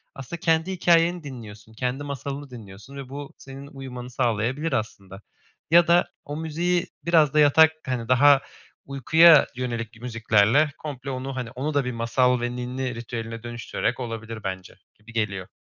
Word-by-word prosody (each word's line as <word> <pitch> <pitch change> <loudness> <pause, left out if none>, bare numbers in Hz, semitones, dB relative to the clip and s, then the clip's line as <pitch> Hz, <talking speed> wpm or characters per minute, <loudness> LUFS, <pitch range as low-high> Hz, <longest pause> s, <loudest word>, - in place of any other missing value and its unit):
Aslında 135 +5 -7
kendi 165 +2 +1
hikâyeni 175 -1 +2
dinliyorsun, 110 -5 -10
kendi 125 +4 -3
masalını 140 0 -6
dinliyorsun 110 +2 -12
ve 135 -2 -8
bu 140 +1 -8
senin 135 +1 -11
uyumanı 130 -3 -8
sağlayabilir 125 +5 -1
aslında. 100 -5 -4 0.5
Ya 170 +1 +6
da 175 +1 +4 0.2
o 145 +1 -6
müziği 170 +3 -1 0.2
biraz 160 -4 +4
da 155 - +3
yatak, 155 +2 +6
hani, 125 -4 -3
daha 140 +2 +6 0.4
uykuya 150 +3 +6
yönelik 115 -2 -5
müziklerle 115 +4 +2
komple 140 -3 -7
onu, 130 0 -4
hani, 125 -3 -5
onu 135 +5 -3
da 145 -2 +1
bir 125 - -2
masal 125 +2 +1
ve 120 0 -3
ninni 125 0 -4
ritüeline 115 -1 -6
dönüştürerek 120 0 -3
olabilir 115 -2 -6
bence, 95 -2 -5 0.2
gibi 110 +2 -17
geliyor. 100 -4 -2
130 Hz, 155 wpm, -24 LUFS, 115-145 Hz, 0.5 s, Ya